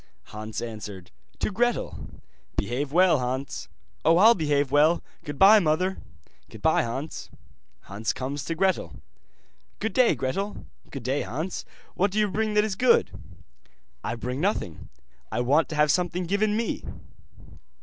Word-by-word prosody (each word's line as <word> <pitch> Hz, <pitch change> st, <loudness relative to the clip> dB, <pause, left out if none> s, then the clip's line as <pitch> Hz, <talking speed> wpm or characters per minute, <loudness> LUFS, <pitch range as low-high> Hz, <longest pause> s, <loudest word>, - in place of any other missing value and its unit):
Hans 110 Hz, +1 st, -5 dB
answered: 105 Hz, -5 st, -8 dB, 0.3 s
'To -, -, -1 dB
Gretel.' 240 Hz, +4 st, -1 dB, 0.5 s
'Behave 130 Hz, +7 st, -1 dB
well, 175 Hz, -2 st, +4 dB
Hans.' 130 Hz, +2 st, -4 dB, 0.3 s
'Oh, 165 Hz, +2 st, +5 dB
I'll 220 Hz, +5 st, +8 dB
behave 145 Hz, -, 0 dB
well. 155 Hz, +4 st, +4 dB, 0.2 s
Goodbye, 190 Hz, +8 st, +6 dB
mother.' 185 Hz, +2 st, 0 dB, 0.5 s
'Goodbye, -, -, +1 dB
Hans.' 130 Hz, +7 st, -5 dB, 0.5 s
Hans 105 Hz, +3 st, -3 dB
comes 135 Hz, +2 st, -4 dB
to 165 Hz, -, -2 dB
Gretel. 190 Hz, +2 st, 0 dB, 0.8 s
'Good 220 Hz, -2 st, -3 dB
day, 250 Hz, +1 st, +4 dB
Gretel.' 195 Hz, +11 st, -3 dB, 0.2 s
'Good 135 Hz, -4 st, -7 dB
day, 135 Hz, +4 st, 0 dB
Hans. 160 Hz, +8 st, -4 dB, 0.3 s
What 200 Hz, +3 st, +1 dB
do 200 Hz, -, -5 dB
you 210 Hz, -2 st, +2 dB
bring 215 Hz, +1 st, -1 dB
that 210 Hz, -, +5 dB
is 215 Hz, -2 st, -1 dB
good?' 245 Hz, +4 st, +3 dB, 0.9 s
'I -, -, -2 dB
bring 125 Hz, +4 st, -4 dB
nothing, 175 Hz, -, -2 dB, 0.4 s
I -, -, 0 dB
want 145 Hz, +6 st, +2 dB
to 155 Hz, -, -4 dB
have 150 Hz, -1 st, +4 dB
something 180 Hz, +1 st, 0 dB
given 205 Hz, +4 st, +1 dB
me. 230 Hz, -1 st, -2 dB
155 Hz, 140 wpm, -26 LUFS, 130-195 Hz, 0.9 s, I'll